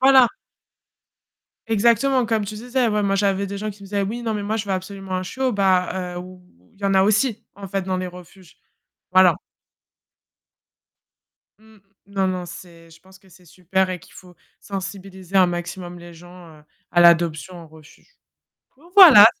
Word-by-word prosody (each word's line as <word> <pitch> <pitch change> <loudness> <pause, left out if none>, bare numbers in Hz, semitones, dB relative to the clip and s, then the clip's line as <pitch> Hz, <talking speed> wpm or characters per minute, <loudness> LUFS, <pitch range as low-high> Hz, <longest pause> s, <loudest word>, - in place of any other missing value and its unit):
voilà. 265 -2 +6 1.4
Exactement. 235 +3 +2
Comme 220 -2 0
tu 205 +2 -7
disais, 245 +2 -1
ouais, 210 -1 0
moi, 195 0 0
j'avais 195 0 0
des 200 +1 -6
gens 215 +1 -4
qui 200 0 -14
me - - -10
disaient: 200 -1 -1
«Oui, 230 +5 -4
non, 225 -2 -2
moi 215 +2 -2
je 215 - -3
veux 195 - -2
absolument 190 0 -6
un 185 - -3
chiot» 255 +7 -2
bah 185 -2 0
heu, - - -4
ou 180 0 -11 0.3
il 200 - -27
y 200 - -7
en 195 - +1
a 190 - +5
aussi, 215 +3 +1
en 195 -1 -10
fait, 195 0 -2
dans 185 0 -3
les 185 0 -3
refuges. 180 0 -14 0.5
Voilà. 185 -1 +5 2.2
Mmh. 220 0 -21 0.3
Non, 195 -1 -1
non, 180 -1 -3
c'est 170 -1 -13
je 165 - -18
pense 190 0 -19
que 195 - -24
c'est 180 0 -20
super 185 +2 -2
et 180 - -4
qu'il 185 - -19
faut 180 -1 -15 0.3
sensibiliser 195 -1 -7
un 185 -1 +6
maximum 175 0 -6
les 175 0 -12
gens, 175 -1 -15
heu, 150 - -22 0.3
à 175 - +2
l'adoption 170 0 +3
en 170 - -11
refuge 155 - -20 0.6
donc 340 +5 -21
voilà. 305 - +10
190 Hz, 180 wpm, -21 LUFS, 180-210 Hz, 2.2 s, voilà